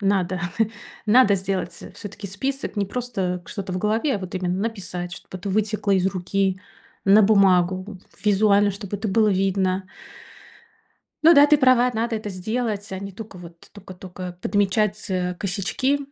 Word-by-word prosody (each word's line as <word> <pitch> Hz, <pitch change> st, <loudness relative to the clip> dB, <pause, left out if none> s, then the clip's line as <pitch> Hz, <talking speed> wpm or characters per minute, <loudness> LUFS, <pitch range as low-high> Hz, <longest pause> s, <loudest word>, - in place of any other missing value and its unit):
надо, 190 Hz, -3 st, 0 dB, 0.7 s
надо 215 Hz, -2 st, +6 dB
сделать, 190 Hz, -2 st, -3 dB
э, -, -, -9 dB
всё-таки 205 Hz, 0 st, -8 dB
список. 265 Hz, +7 st, -3 dB
Не 200 Hz, -1 st, 0 dB
просто 195 Hz, -7 st, -3 dB
к -, -, -17 dB
что-то 195 Hz, -2 st, -5 dB
в 185 Hz, -, -2 dB
голове, 220 Hz, +8 st, +1 dB
а -, -, -1 dB
вот 185 Hz, -1 st, -7 dB
именно 180 Hz, -1 st, -1 dB
написать, 185 Hz, -5 st, -4 dB
чтобы 185 Hz, 0 st, -9 dB
это 190 Hz, +3 st, -6 dB
вытекло 210 Hz, +1 st, 0 dB
из 190 Hz, -1 st, +3 dB
руки 190 Hz, 0 st, -1 dB, 0.4 s
на 205 Hz, +2 st, +6 dB
бумагу 190 Hz, -1 st, +3 dB, 0.3 s
визуально, 205 Hz, 0 st, +4 dB
чтобы 200 Hz, 0 st, -5 dB
это 215 Hz, +2 st, -3 dB
было 215 Hz, +2 st, +3 dB
видно. 190 Hz, -1 st, +1 dB, 1.4 s
Ну 330 Hz, +2 st, +8 dB
да, 285 Hz, +1 st, +8 dB
ты 300 Hz, -, +5 dB
права, 255 Hz, -2 st, +4 dB
надо 230 Hz, +1 st, -1 dB
это 215 Hz, -1 st, -5 dB
сделать, 210 Hz, +2 st, -3 dB
а 190 Hz, -, -3 dB
не 200 Hz, 0 st, -6 dB
только 205 Hz, -2 st, -10 dB
вот 170 Hz, -1 st, -13 dB
тока 195 Hz, -2 st, -11 dB
тока 180 Hz, -1 st, -8 dB
подмечать, 205 Hz, +1 st, 0 dB
э, 180 Hz, -1 st, -1 dB
косячки. 200 Hz, +10 st, -1 dB
200 Hz, 165 wpm, -23 LUFS, 185-215 Hz, 1.4 s, Ну